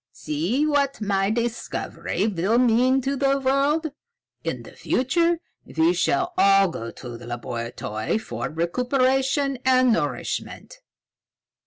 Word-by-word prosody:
"See 180 - -1
what 285 -2 +1
my 195 -2 0
discovery 235 -3 -2
will 205 +2 +1
mean 250 +2 +3
to 275 +2 -1
the 275 0 +2
world! 280 +4 +1 0.5
In - - -3
the - - -12
future 335 +6 +1 0.3
we 160 +2 +1
shall 350 - 0
all 195 -1 +5
go 115 -8 -6
to 120 -1 -9
the 120 - -11
laboratory 115 - -3
for 220 - -5
recuperation 260 - +1
and 255 -2 +4
nourishment. - - -3
245 Hz, 120 wpm, -24 LUFS, 175-275 Hz, 0.5 s, all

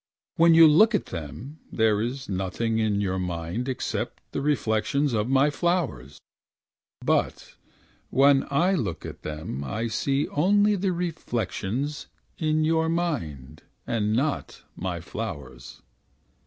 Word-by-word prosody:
When 165 0 +6
you 165 0 +9
look 215 +9 +5
at - - 0
them. 115 - -7
There 110 -2 +2
is 130 +4 -4
nothing 100 +4 -1
in 105 -2 +1
your 95 -2 -1
mind 90 +7 -3
Except 130 - -3
the - - -3
reflections 140 0 +1
Of 110 +1 0
my 135 +2 +4
flowers. 145 - -1 0.9
But - - 0 0.6
when 140 0 +4
I 170 +7 +2
look 110 - -2
at - - -8
them 75 -3 -5
I 110 - -3
see 140 +5 0
only 205 +6 +3
the 190 0 0
reflections 145 - -3 0.3
In 155 -1 +1
your 160 0 +2
mind. 125 - -3 0.2
And 105 -2 0
not 140 +6 -2
my 90 -2 -4
flowers. 95 -4 -7
125 Hz, 130 wpm, -26 LUFS, 100-155 Hz, 0.9 s, you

